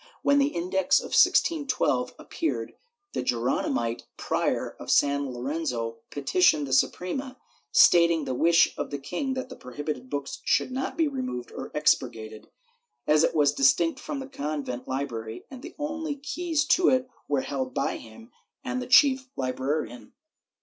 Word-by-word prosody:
When 285 0 +4
the 280 - +4
Index 185 -4 +1
of - - -8
1612 285 -6 +2
appeared, 325 - -3 0.4
the - - -1
Geroni 120 +1 0
mite 115 0 -2
Prior - - -1
of - - -9
San 140 -1 +2
Lorenzo 120 -3 -3
petitioned 150 +1 +2
the 135 - -4
Suprema, 255 - 0 0.3
stating 170 -1 +5
the - - -2
wish 165 +6 +4
of - - -3
the 145 - -4
king 180 - -3
that 260 0 -4
the 255 - -9
prohibited 130 0 -6
books 140 0 -4
should - - +1
not 265 +1 -3
be 325 -2 +3
removed 255 - -4
or - - -7
expurgated, 110 -7 0 0.6
as 150 +1 +4
it - - +1
was 145 -2 +4
distinct 155 +4 +3
from 295 - -5
the 265 - -6
convent 145 - -4
library, 120 -4 -4
and 260 -2 -9
the 335 +4 -10
only 305 0 -3
keys 315 +2 -2
to 345 +3 +4
it 255 0 +2 0.2
were 140 -2 +1
held 130 -2 -4
by - - -1
him 120 - -14 0.3
and 255 -1 -3
the 250 - -6
chief 260 0 +5
librarian. 130 0 -3
160 Hz, 155 wpm, -26 LUFS, -, 0.6 s, stating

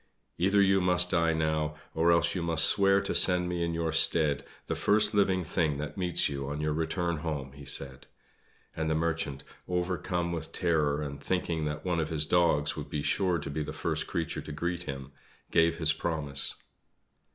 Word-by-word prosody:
"Either 100 +3 +3
you 95 0 +3
must 90 0 +3
die 85 -2 +2
now, 80 -1 -1 0.2
or 85 +1 +3
else 85 - +2
you 90 - -3
must 85 -1 +2
swear 100 0 +4
to 100 - -2
send 90 -1 +5
me 90 -1 -2
in 85 - -1
your 80 -1 -2
stead 80 -2 +3 0.2
the - - -3
first 105 +1 +2
living 95 -3 +2
thing 80 -3 0
that 75 +1 -6
meets 90 -3 +1
you 70 -1 -5
on 75 +1 -4
your 75 0 -1
return 85 +2 -2
home," 75 -4 -4
he 70 +1 -12
said; 65 -2 -2 0.7
and 80 0 -2
the 80 - +1
Merchant, 80 -4 -2 0.2
overcome 90 -1 -2
with 80 -2 -5
terror, 75 -4 0
and 70 -1 -7
thinking 85 -4 -2
that 75 +3 -5
one 90 -2 0
of 80 -1 -2
his 80 -2 +1
dogs 80 -3 +2
would - - -7
be 75 - -3
sure 90 0 +1
to 70 - -6
be 75 - -3
the 75 - -4
first - - -2
creature 85 -2 -3
to - - -9
greet 85 +3 -3
him, 70 0 -7 0.4
gave 85 0 +3
his 80 -2 +4
promise. 75 -4 -1
80 Hz, 195 wpm, -29 LUFS, 75-90 Hz, 0.7 s, send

